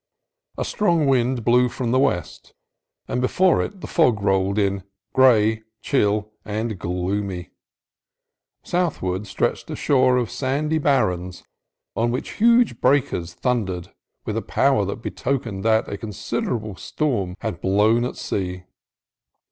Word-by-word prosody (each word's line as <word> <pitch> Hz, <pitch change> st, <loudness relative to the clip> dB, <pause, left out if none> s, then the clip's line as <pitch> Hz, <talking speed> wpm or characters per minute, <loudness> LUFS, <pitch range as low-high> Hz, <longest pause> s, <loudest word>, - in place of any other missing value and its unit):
A -, -, -2 dB
strong 170 Hz, -7 st, +1 dB
wind 125 Hz, -3 st, +1 dB
blew 125 Hz, +1 st, +4 dB
from 120 Hz, -1 st, -3 dB
the 130 Hz, -, +3 dB
west, 130 Hz, -11 st, -2 dB, 0.5 s
and 125 Hz, -, -1 dB
before 180 Hz, +8 st, +3 dB
it 195 Hz, -3 st, -6 dB
the -, -, -6 dB
fog 125 Hz, -, +3 dB
rolled 95 Hz, 0 st, +1 dB
in, 100 Hz, -1 st, +1 dB, 0.3 s
gray, 110 Hz, -4 st, +4 dB, 0.2 s
chill, 105 Hz, -5 st, 0 dB
and 110 Hz, -1 st, -3 dB
gloomy. 90 Hz, +1 st, -3 dB, 1.1 s
Southward 105 Hz, -, -1 dB
stretched -, -, -2 dB
a -, -, -4 dB
shore 130 Hz, -2 st, +3 dB
of 120 Hz, -3 st, -1 dB
sandy 150 Hz, +4 st, -1 dB
barrens 95 Hz, -, 0 dB, 0.5 s
on 115 Hz, +1 st, +1 dB
which 125 Hz, +4 st, -3 dB
huge 235 Hz, 0 st, +4 dB
breakers 125 Hz, -11 st, +1 dB
thundered, 100 Hz, -9 st, -2 dB, 0.3 s
with -, -, -3 dB
a -, -, -1 dB
power -, -, +2 dB
that -, -, -5 dB
betokened 120 Hz, -7 st, -3 dB
that 110 Hz, 0 st, +2 dB
a 100 Hz, -, -5 dB
considerable 110 Hz, -, -3 dB
storm 100 Hz, -, -2 dB
had 95 Hz, -6 st, -4 dB
blown 105 Hz, +5 st, +3 dB
at 125 Hz, -, -3 dB
sea. 90 Hz, -2 st, -3 dB
115 Hz, 130 wpm, -22 LUFS, 100-130 Hz, 1.1 s, blew